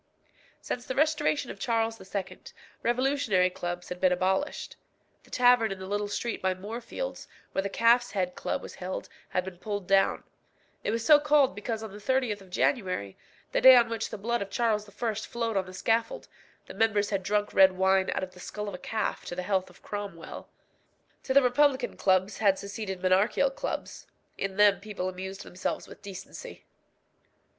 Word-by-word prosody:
Since 245 0 -4
the 260 - -3
restoration 300 -2 +1
of - - -11
Charles 225 -2 0
II. 195 0 -5 0.4
revolutionary 240 -7 +2
clubs 175 0 -5
had 180 0 -6
been 185 -1 +4
abolished. 190 +10 -1 0.5
The - - -20
tavern 245 -3 +4
in 195 - -4
the 190 - -7
little 205 +1 -1
street 230 +3 -3
by 190 0 +1
Moorfields, 230 - -6 0.2
where - - 0
the 200 - -3
Calf's 235 +3 +4
Head 180 -3 -1
Club - - -3
was - - -8
held, 185 +1 -5 0.2
had 185 0 -1
been 185 -2 -8
pulled 205 -2 -4
down; 195 0 +3 0.6
it - - -1
was 230 +1 -1
so 300 -2 +8
called 295 -4 +4
because 220 +2 -4
on 220 - -7
the 205 - -10
30th 225 -2 0
of 190 - -15
January, 180 - 0 0.4
the - - +1
day 260 0 +10
on 240 -2 +5
which 225 -1 -3
the - - -6
blood 235 +3 -1
of 200 - -4
Charles 215 -2 0
I. 220 +2 -2
flowed 230 +1 -3
on 190 -1 0
the - - -9
scaffold, 230 - -1 0.4
the - - -10
members 210 0 +1
had 195 -1 0
drunk 205 +2 0
red 190 -1 +7
wine 190 0 +2
out - - -1
of 185 - -5
the 180 - -16
skull 210 +3 -6
of 200 - -5
a 180 - -6
calf 220 -1 -2
to 175 - -5
the 180 - -3
health 190 -1 0
of 180 - -20
Cromwell. 200 -5 -7 0.8
To - - -3
the 280 - +7
republican 260 +1 +2
clubs 190 +1 +2
had 200 -3 +4
succeeded 200 -2 -5
monarchical 195 - +3
clubs. - - -5 0.3
In 195 -1 -4
them 205 -1 +6
people 200 -3 -4
amused 190 +2 -7
themselves 180 - -4
with - - -13
decency. 200 - -9
205 Hz, 185 wpm, -28 LUFS, 190-235 Hz, 0.8 s, day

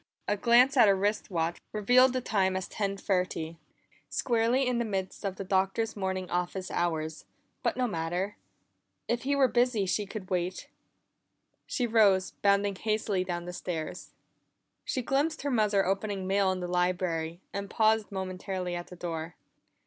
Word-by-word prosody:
A 205 - +2
glance 245 +6 +5
at 235 - +8
her 200 - +5
wrist 205 +3 0
watch 170 -2 -1
revealed 245 +5 +5
the 255 - 0
time 190 -5 +1
as 190 0 -2
ten 200 -2 -2
thirty; 180 -4 -1 0.5
squarely 240 +2 +2
in 250 -1 +1
the - - +1
midst 195 -3 -3
of 195 -2 -2
the 195 - -5
Doctor's 195 +4 0
morning 190 -2 -2
office 180 +1 -2
hours, 160 -2 -2 0.4
but - - 0
no 255 - +2
matter. 175 +1 -2 0.7
If 240 0 0
he 280 +3 0
were 275 -2 +5
busy 240 -5 +2
she 195 +3 -1
could 200 -2 -7
wait. 180 0 -2 1.0
She 245 - 0
rose, 205 -5 +4
bounding 200 0 +3
hastily 215 -3 0
down 175 -1 -4
the 180 - -6
stairs. 165 -3 -5 0.7
She 255 - -2
glimpsed 290 +4 0
her 285 - -1
mother 210 -4 +3
opening 195 0 -1
mail 195 0 +2
in 185 -1 -3
the 180 - -3
library, 175 -2 0
and 200 0 -4
paused 220 -1 +2
momentarily 185 -1 -4
at 175 0 -4
the 180 - -10
door. 165 -1 -5
195 Hz, 165 wpm, -29 LUFS, 180-220 Hz, 1.0 s, at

